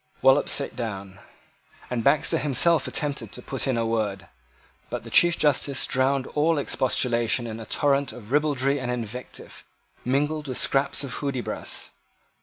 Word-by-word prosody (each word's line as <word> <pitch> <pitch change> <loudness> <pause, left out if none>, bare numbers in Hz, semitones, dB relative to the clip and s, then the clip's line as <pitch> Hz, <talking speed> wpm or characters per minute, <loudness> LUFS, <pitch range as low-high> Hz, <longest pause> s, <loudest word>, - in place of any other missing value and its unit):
Wallop 135 +2 +5
sate 140 - +2
down; 100 -5 -6 0.7
and 120 -2 -1
Baxter 150 - +3
himself 155 +4 +3
attempted 140 -8 -3
to 125 - -7
put 135 0 -3
in 130 -3 +1
a 115 - 0
word. 105 -5 -2 0.6
But - - -5
the - - -10
Chief 175 0 +5
Justice 140 -2 +1
drowned 130 +1 +1
all 155 +2 +2
expostulation 120 -3 +1
in 110 -1 -6
a 110 - -9
torrent 140 -2 +1
of 110 -1 -12
ribaldry 145 -1 +1
and 125 -2 -4
invective, 125 0 -6 0.4
mingled 150 +4 -1
with 130 - -3
scraps 140 +1 +1
of 135 -2 -5
Hudibras. 135 -4 -3
130 Hz, 150 wpm, -25 LUFS, 120-145 Hz, 0.7 s, Wallop